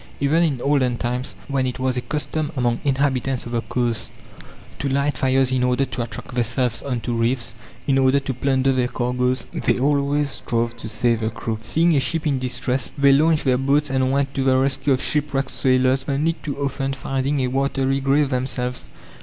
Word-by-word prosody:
Even 145 +4 +2
in 150 -7 +1
olden 130 -4 +1
times, 125 +2 -3
when 135 -2 0
it 125 - -4
was 130 -1 0
a 125 - -1
custom 150 +2 -3
among 120 -2 +1
inhabitants 135 -2 0
of 120 - -7
the 120 -1 0
coasts 120 -2 -2 0.7
to 140 - -1
light 140 +1 +1
fires 130 0 +2
in 130 -1 +1
order 125 +2 +2
to 125 - -5
attract 115 -2 -7
vessels 120 0 0
on 125 -4 -3
to 120 - -3
reefs, 120 +1 0 0.3
in 135 -1 +2
order 135 +1 +4
to 135 -1 -4
plunder 135 +1 +1
their 125 -1 +1
cargoes, 125 +1 -1
they - - +1
always 140 +1 +1
strove 115 -1 -1
to 110 -1 -6
save 115 0 +1
the 110 -1 -1
crew. 110 0 -4
Seeing 165 +6 +2
a - - +4
ship 155 +5 -1
in 140 -3 +1
distress, 125 0 -2
they 140 0 +5
launched 155 +2 +3
their 125 -1 +3
boats 140 +1 +1
and 130 -1 +1
went 140 0 0
to 135 - -1
the 130 -1 +3
rescue 135 +2 +1
of 130 - -1
shipwrecked 145 -2 -1
sailors, 130 0 +2
only 150 +4 +1
too 145 -4 -6
often 135 -1 -2
finding 135 +1 -1
a 130 - +1
watery 135 0 0
grave 140 +1 +2
themselves. 125 -1 -2
130 Hz, 195 wpm, -22 LUFS, 125-140 Hz, 0.7 s, they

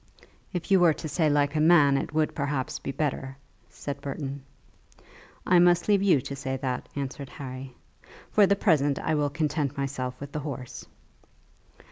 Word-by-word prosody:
"If 180 +1 -5
you 190 - +6
were 170 -3 +5
to - - -6
say 155 0 +1
like 145 +1 +1
a - - +2
man, 150 -3 +5
it 135 - -2
would 155 0 0
perhaps 145 0 -2
be - - -4
better," 135 -2 -3 0.3
said 140 - -6
Burton. 140 0 -5 1.0
"I 180 -1 +5
must 175 0 +4
leave 205 -2 +4
you 185 -9 +4
to 140 - -6
say 135 -1 -3
that," 130 -2 -3
answered 140 -1 -5
Harry; 130 -1 -8 0.6
"for 205 -2 +5
the 200 - +3
present 145 -8 +2
I - - -1
will 145 -1 +1
content 150 -2 -1
myself 130 -2 -3
with 140 0 -8
the 150 - -3
horse." 135 -4 -7
145 Hz, 170 wpm, -27 LUFS, 135-160 Hz, 1.0 s, you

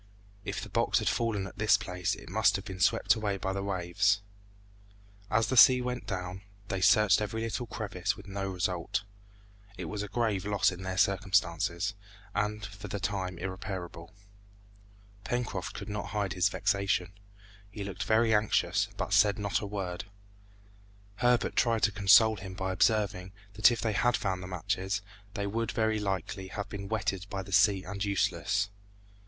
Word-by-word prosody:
If - - -4
the - - -8
box - - +2
had - - -1
fallen 110 -4 0
at 95 - -11
this 105 0 +5
place 90 -4 -2
it - - -13
must 100 +2 +3
have 95 0 -4
been 95 -1 -7
swept - - +4
away 105 -3 -2
by 95 0 -2
the 100 - -2
waves. 100 +1 +1 1.1
As 110 +1 +2
the 130 - -1
sea 125 +1 +8
went 125 0 -4
down, 90 -1 -4 0.3
they 95 -3 -2
searched 105 +1 +5
every 105 +2 -3
little 115 +2 -3
crevice 100 -3 -3
with 100 - -12
no 95 0 -3
result. 90 0 -2 0.7
It - - -5
was 105 -1 -4
a 105 - -4
grave 110 -4 0
loss 100 -2 +2
in 90 0 -8
their 95 0 -4
circumstances, 95 -2 +1 0.4
and 105 0 -1
for 100 +1 -9
the 100 +1 -4
time 95 -2 -3
irreparable. 95 -2 -6 1.1
Pencroft 120 -7 -3
could 100 - -6
not 105 -1 -4
hide 100 -2 -2
his 95 +1 +2
vexation; 100 -3 0 0.6
he 100 0 -6
looked 100 -1 -6
very 110 0 +3
anxious, 105 0 +2
but - - -2
said 105 0 +5
not 100 -1 -1
a 105 - -4
word. 95 -3 -4 1.1
Herbert 120 0 +2
tried 115 -2 +2
to 105 - +4
console 105 +2 +6
him 95 -1 -8
by 95 0 -2
observing, 95 -2 +1 0.2
that 105 +2 +6
if 120 -2 -2
they 110 -2 0
had 120 +3 +2
found 95 -2 -2
the 90 - -7
matches, 95 +2 -2 0.3
they 100 - -2
would, 115 +3 -2
very 110 -1 +1
likely, 95 -1 -3
have 105 +2 -5
been 100 -1 -6
wetted 100 -3 -2
by 95 -1 -4
the 100 - -11
sea 100 0 +4
and 100 -1 -4
useless. 100 0 0
100 Hz, 170 wpm, -30 LUFS, 95-105 Hz, 1.1 s, sea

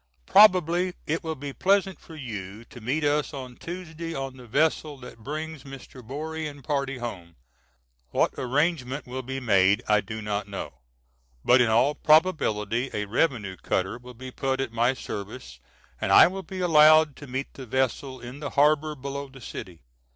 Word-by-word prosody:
Probably 180 -3 +5
it 160 +2 -2
will 160 -1 -3
be 140 0 -7
pleasant 195 +2 +1
for 160 - -13
you 110 -6 -7
to 120 - -13
meet 135 +8 -1
us 145 +1 +1
on 130 -2 -8
Tuesday 165 -1 -7
on 135 -1 -4
the 125 -2 -13
vessel 150 +3 +1
that 125 -2 -12
brings 155 +4 -5
Mr. 135 -1 -11
Borie 155 +6 -5
and 145 -2 -10
party 140 -1 -1
home. 90 -9 -7 0.7
What - - +1
arrangement 140 0 -1
will 130 +1 -5
be 135 +1 -5
made 100 -2 +3
I 105 -1 +4
do 110 +2 -7
not 105 -1 -3
know; 100 -9 -7 0.7
but 125 +1 +6
in 120 - +3
all 120 +6 +3
probability 135 - +2
a 105 - -1
revenue 105 - 0
cutter 95 +7 -2
will 125 0 -12
be 130 +2 -9
put 135 +1 -2
at 135 -4 -3
my 120 +3 +2
service 105 +1 -7 0.4
and - - 0
I - - +9
will 190 +2 -2
be 190 -1 -7
allowed 155 -3 +6
to 145 - -10
meet 130 +2 -4
the 130 -2 -9
vessel 130 +2 -1
in 120 +4 -9
the 145 -1 -4
harbor 150 +1 +2
below 140 +1 -6
the 135 0 -14
city. 95 -7 -9
135 Hz, 175 wpm, -26 LUFS, 120-155 Hz, 0.7 s, I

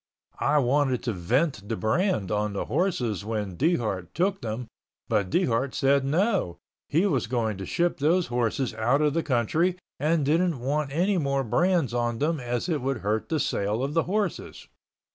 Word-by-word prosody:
I 150 - +2
wanted 135 -1 +2
to 120 - -1
vent 105 - 0
the 115 - 0
brand 110 - 0
on 105 0 0
the 100 - -2
horses 125 - -1
when 105 -4 -3
Dehart 110 - -1
took 195 +2 0
them 115 +2 -4 0.4
but 105 -4 0
Dehart 130 - +1
said 140 0 +3
no, 170 - +1 0.3
he 165 +7 +2
was 135 -12 +1
going 110 -4 -1
to 95 - -5
ship 175 -2 0
those 165 +5 +3
horses 120 +1 -1
out 120 +7 +1
of 150 -2 +2
the 165 - +1
country 155 +7 +1 0.2
and 155 +1 +1
didn't 165 0 +2
want 140 +3 -1
any 180 +6 +1
more 140 -2 0
brands 170 - +1
on 120 -1 0
them 155 +4 0
as 120 +3 -2
it 155 -6 -1
would 135 -2 -2
hurt 105 +2 -1
the 160 - 0
sale 105 0 -1
of 140 +2 -2
the 165 0 +2
horses. 205 -2 -2
135 Hz, 180 wpm, -26 LUFS, 110-165 Hz, 0.4 s, said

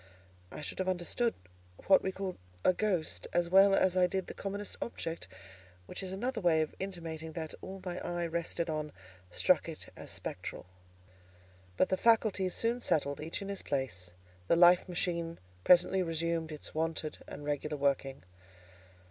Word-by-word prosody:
I - - -7
should 150 - -4
have 185 0 0
understood 185 +6 0 0.5
what 190 - +6
we 190 - -1
call 190 -1 -4 0.3
a 185 - +6
ghost, 185 -5 -1
as 175 0 +1
well 195 +1 +7
as 185 -1 +3
I 180 -1 +5
did 190 0 -2
the - - -7
commonest 200 +1 -3
object: 165 -7 -4 0.6
which - - -6
is 190 -1 -4
another 230 +4 -2
way 165 -3 +4
of 155 - -6
intimating 165 -4 -5
that 160 -1 -5
all 190 +1 -7
my 180 0 -3
eye 175 0 -2
rested 170 0 -2
on 155 -2 -3 0.4
struck - - +3
it - - -7
as - - -9
spectral. - - -4 1.1
But 185 - +3
the 185 - +2
faculties 215 -5 +3
soon 235 +2 0
settled 145 -7 +1
each 165 +6 -3
in 200 - -6
his 200 - -3
place; 110 -11 -3 0.4
the - - +5
life 175 +2 +6
machine 170 -2 -1 0.3
presently 180 +1 +5
resumed 165 -1 -1
its 150 - -7
wonted 160 -1 -2
and 145 - -8
regular 150 +1 -2
working. 140 -1 0
175 Hz, 165 wpm, -32 LUFS, 160-190 Hz, 1.1 s, well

